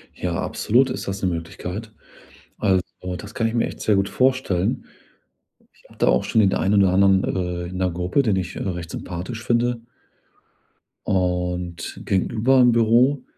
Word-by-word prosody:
Ja, 90 -2 -3
absolut 130 +4 +2
ist 125 - -5
das 95 0 -4
‘ne 95 - +1
Möglichkeit. 90 +5 -6 0.7
Also, 95 -3 +2 0.3
das 105 +4 -10
kann 115 - 0
ich 115 - -2
mir 115 - +2
echt - - -8
sehr 105 - +2
gut 100 0 +1
vorstellen. 130 -7 0 0.9
Ich - - -28
hatte - - 0
auch - - +2
schon 110 - +2
in 100 -3 +4
der - - -1
ein 100 +2 +1
oder 100 -2 +5
anderen 95 0 +4
äh, 90 -1 -2
in 90 - -7
‘ner 95 -1 +1
Gruppe, 90 +10 0
den 110 -7 +1
ich, 95 0 -3
äh, - - -5
recht 85 -3 -4
sympathisch 95 +7 -6
finde 120 0 0 1.2
und 90 -2 -2
gegenüber 115 +7 +2
im 125 -1 +6
Büro, 120 +4 +3
95 Hz, 170 wpm, -22 LUFS, 90-115 Hz, 1.2 s, im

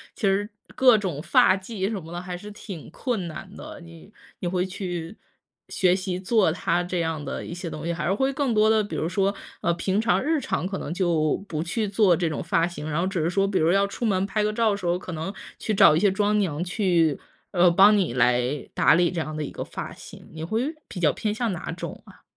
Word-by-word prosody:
其 - - -15
实 200 +2 +1 0.3
各 250 -4 +6
种 180 -8 -3
发 185 - +4
髻 195 0 -4
什 210 -4 -3
么 165 +1 -11
的 175 - -4
还 180 0 -6
是 205 +4 -9
挺 195 -5 -9
困 210 - -3
难 170 +4 -8
的， - - -9
你 165 +4 -14 0.3
你 180 - -3
会 180 +1 0
去 180 -1 -5 0.5
学 180 -2 +3
习 185 -1 -3
做 195 -1 +3
它 175 +1 0
这 180 0 -2
样 160 -2 -2
的 - - -4
一 - - -6
些 175 0 -5
东 155 0 -7
西， 170 - -1
还 155 -2 -3
是 190 - +2
会 265 +6 +1
更 270 -3 0
多 215 0 +4
的， 220 -1 +4
比 205 - -5
如 160 - -1
说， 195 +1 +1 0.3
呃， 170 - +2
平 190 +4 0
常 230 +1 +2
日 320 +1 +1
常 180 - -2
可 195 +1 -3
能 165 - -5
就 170 -5 +1
不 155 -1 -2
去 205 +6 -1
做 200 -3 +4
这 170 -1 0
种 155 - -3
发 165 0 +1
型， 170 -3 -6
然 155 +2 -1
后 180 - +1
只 190 -3 -1
是 160 - +1
说 195 +2 +2
比 195 -1 0
如 160 - +2
说 175 - +4
要 200 0 +4
出 200 +4 -4
门 195 -3 +1
拍 210 +2 -1
个 210 - 0
照 225 -1 +2
的 200 - -1
时 190 - -8
候， 175 0 +2
可 185 0 -8
能 165 +4 -4 0.3
去 215 - -2
找 155 - +7
一 160 - +3
些 205 - +4
妆 210 +2 +1
娘 170 -5 -1
去， 175 -5 +1 0.3
呃， 180 -2 +5
帮 200 +4 +6
你 185 -11 0
来 125 +3 +1
打 - - +5
理 175 0 +3
这 175 - -3
样 155 -1 -4
的 155 - -3
一 - - -6
个 - - -7
发 - - -7
型？ - - -13
你 160 - -9
会 225 - -1
比 180 - -7
较 150 -4 +4
偏 210 +6 -2
向 235 -1 -1
哪 175 - -5
种 - - -7
啊？ - - -17
185 Hz, 275 characters per minute, -25 LUFS, 165-205 Hz, 0.5 s, 找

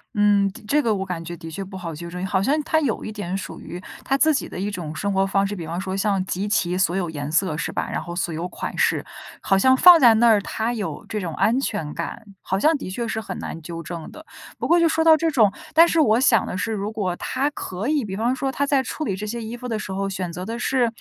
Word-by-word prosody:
嗯， 205 -1 +4
对， - - -12
这 295 +5 +3
个 230 -4 +1
我 195 -1 -2
感 180 -3 -4
觉 170 +1 -7
的 165 0 -9
确 195 +5 -5
不 190 0 -9
好 165 -4 -6
纠 170 +2 -7
正。 180 +2 -4
好 190 0 0
像 295 +6 +2
她 315 +1 +1
有 255 -7 -1
一 215 - -5
点 190 -3 -4
属 - - -7
于 175 +2 -8 0.2
她 270 - +1
自 315 +2 +4
己 275 - -2
的 - - -7
一 200 - -1
种 170 -6 -5
生 200 +5 -1
活 195 0 +2
方 195 0 +1
式。 205 - -4
比 170 -4 -6
方 170 +3 -4
说 190 0 -3
像 195 -2 +1
集 190 +2 -2
齐 180 -4 +1
所 185 -1 +1
有 175 -4 -1
颜 145 -1 -5
色 170 -2 +1
是 165 - -3
吧， - - -3
然 - - -2
后 175 - -7
所 175 -2 -2
有 165 +3 -3
款 - - -6
式。 - - +1 0.4
好 195 - +2
像 260 +7 +5
放 355 +4 +9
在 235 -3 +8
那 235 +2 +4
儿 215 -3 +5
她 225 +4 -2
有 215 -4 -5
这 215 - -3
种 170 -3 -4
安 230 +4 +2
全 180 - -3
感， 170 +6 -5 0.2
好 190 - -1
像 315 +6 +4
的 275 - -7
确 235 +5 -3
是 220 0 -2
很 220 - -6
难 165 - -6
纠 165 +1 -7
正 165 -1 -7
的。 310 +1 -12 0.3
不 - - -3
过 340 - +5
就 330 - +4
说 320 0 +1
到 320 -1 +7
这 325 +1 0
种 215 -7 +4 0.2
但 330 +2 +7
是 335 - +1
我 220 -4 +4
想 230 -5 +4
的 - - -4
是 220 +4 -2
如 205 0 -3
果 195 -5 -2
她 270 +8 -1
可 210 -6 -5
以， 300 -3 +1
比 195 -3 -5
方 235 +4 +1
说 270 0 -2
她 285 +1 0
在 275 -2 +2
处 310 +4 -4
理 195 - -1
这 210 - -5
些 235 +3 -4
衣 225 +1 -6
服 250 +1 -7
的 220 -2 -2
时 190 -2 -5
候 195 0 -2
选 185 -3 -4
择 180 +2 -5
的 230 +2 -5
是， 245 -2 +1
205 Hz, 310 characters per minute, -23 LUFS, 180-240 Hz, 0.4 s, 放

